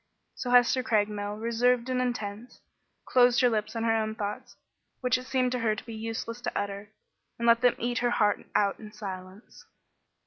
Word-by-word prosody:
So 250 Hz, -, -5 dB
Hester 245 Hz, +1 st, +5 dB
Craigmile, 210 Hz, -3 st, 0 dB
reserved 235 Hz, +2 st, +1 dB
and 255 Hz, -1 st, 0 dB
intense, 240 Hz, -2 st, -4 dB, 0.5 s
closed 245 Hz, -1 st, +4 dB
her 250 Hz, -, +5 dB
lips 215 Hz, 0 st, -2 dB
on 225 Hz, -, -2 dB
her 225 Hz, -1 st, +2 dB
own 220 Hz, -1 st, -1 dB
thoughts, 235 Hz, +4 st, -5 dB, 0.4 s
which 250 Hz, -1 st, +1 dB
it 255 Hz, 0 st, -4 dB
seemed 255 Hz, -1 st, +1 dB
to 250 Hz, -, -1 dB
her 220 Hz, -2 st, +1 dB
to -, -, -9 dB
be 230 Hz, -, -8 dB
useless 225 Hz, +2 st, -5 dB
to -, -, -3 dB
utter, 200 Hz, 0 st, -5 dB, 0.5 s
and 235 Hz, -, -1 dB
let 230 Hz, 0 st, +5 dB
them 245 Hz, -1 st, +4 dB
eat 240 Hz, +1 st, -1 dB
her 245 Hz, -, +1 dB
heart 210 Hz, -3 st, +1 dB
out 200 Hz, -1 st, +2 dB
in 215 Hz, -1 st, -10 dB
silence. 190 Hz, -1 st, -9 dB
230 Hz, 185 wpm, -28 LUFS, 210-245 Hz, 0.5 s, Hester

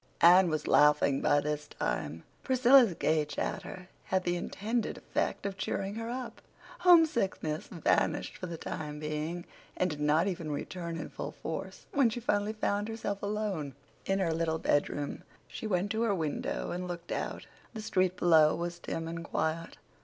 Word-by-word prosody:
Anne 180 Hz, +1 st, +8 dB
was 155 Hz, -1 st, -2 dB
laughing 140 Hz, 0 st, +4 dB
by 145 Hz, -, +4 dB
this 150 Hz, 0 st, -3 dB
time. 75 Hz, -, -3 dB, 0.2 s
Priscilla's 255 Hz, -5 st, +5 dB
gay 155 Hz, -1 st, +2 dB
chatter 180 Hz, +5 st, -5 dB, 0.2 s
had 190 Hz, -1 st, 0 dB
the 175 Hz, 0 st, 0 dB
intended 215 Hz, +6 st, -2 dB
effect -, -, -2 dB
of 195 Hz, 0 st, -4 dB
cheering 195 Hz, +1 st, -2 dB
her 225 Hz, +1 st, -4 dB
up; 250 Hz, 0 st, -5 dB, 0.4 s
homesickness 235 Hz, -, +3 dB
vanished 170 Hz, -6 st, 0 dB
for 185 Hz, -, -6 dB
the 170 Hz, -1 st, -5 dB
time 150 Hz, -2 st, -5 dB
being, 155 Hz, +3 st, -3 dB, 0.3 s
and 185 Hz, -1 st, +1 dB
did 150 Hz, -, -6 dB
not 150 Hz, +3 st, +3 dB
even 175 Hz, -5 st, -3 dB
return 170 Hz, +3 st, -4 dB
in 155 Hz, -, -5 dB
full -, -, -6 dB
force -, -, -6 dB
when 275 Hz, -5 st, +4 dB
she 225 Hz, -, -4 dB
finally 210 Hz, -2 st, 0 dB
found 205 Hz, -1 st, -1 dB
herself 215 Hz, -3 st, -4 dB
alone 200 Hz, -, -2 dB, 0.3 s
in 195 Hz, -, +2 dB
her 175 Hz, -4 st, +1 dB
little 160 Hz, 0 st, 0 dB
bedroom. 145 Hz, -1 st, 0 dB, 0.3 s
She 220 Hz, -, -6 dB
went 195 Hz, 0 st, 0 dB
to 220 Hz, -, 0 dB
her 225 Hz, -4 st, +2 dB
window 155 Hz, -5 st, -2 dB
and 180 Hz, +1 st, -3 dB
looked 175 Hz, -1 st, -6 dB
out. -, -, -3 dB, 0.3 s
The 220 Hz, -, -4 dB
street 185 Hz, -3 st, +1 dB
below 160 Hz, -4 st, +5 dB
was 175 Hz, 0 st, -4 dB
dim 165 Hz, -1 st, -4 dB
and 165 Hz, 0 st, -5 dB
quiet. 165 Hz, +1 st, -2 dB
175 Hz, 170 wpm, -31 LUFS, 155-205 Hz, 0.4 s, Anne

